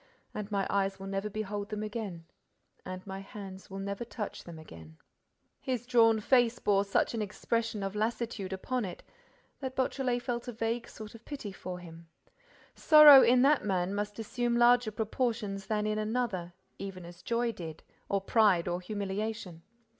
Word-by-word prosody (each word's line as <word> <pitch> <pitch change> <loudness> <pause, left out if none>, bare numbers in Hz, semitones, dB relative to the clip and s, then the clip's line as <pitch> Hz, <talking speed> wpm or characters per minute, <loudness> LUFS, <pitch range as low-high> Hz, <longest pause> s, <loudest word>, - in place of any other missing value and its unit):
And 210 0 -5
my 200 -1 0
eyes 195 -1 0
will 195 - -7
never 195 +2 -3
behold 205 0 -4
them 210 0 -3
again 210 -6 -5 0.6
and 185 0 -7
my 190 -1 -6
hands 195 -1 -10
will 195 - -7
never 200 +3 -4
touch 225 -2 -6
them 170 -2 -9
again—" 80 - -13 0.6
His 250 -3 -3
drawn 225 -3 +4
face 240 +1 +3
bore 200 -1 +2
such 200 +3 +1
an 225 - -2
expression 220 +1 -2
of 195 +1 -3
lassitude 220 -2 -2
upon 240 +6 -2
it 180 -3 -7 0.6
that 265 -1 -5
Beautrelet 255 -2 0
felt 240 0 -3
a 245 - -4
vague 230 +1 -2
sort 215 -1 -10
of 230 0 -13
pity 275 -8 -6
for 185 -1 -7
him. 170 -1 -12 0.7
Sorrow 300 -3 +9
in 250 +1 +5
that 285 +1 +4
man 190 -2 0
must 205 0 -3
assume 235 +2 -1
larger 240 -1 +5
proportions 215 -2 -2
than 210 -1 0
in 215 0 0
another, 215 -6 -2 0.3
even 190 -3 -7
as 175 0 -12
joy 235 0 0
did, 165 -6 -8 0.3
or 200 -1 +1
pride, 195 -4 +3
or 175 +1 -2
humiliation. 200 -2 -4
210 Hz, 170 wpm, -30 LUFS, 195-235 Hz, 0.7 s, Sorrow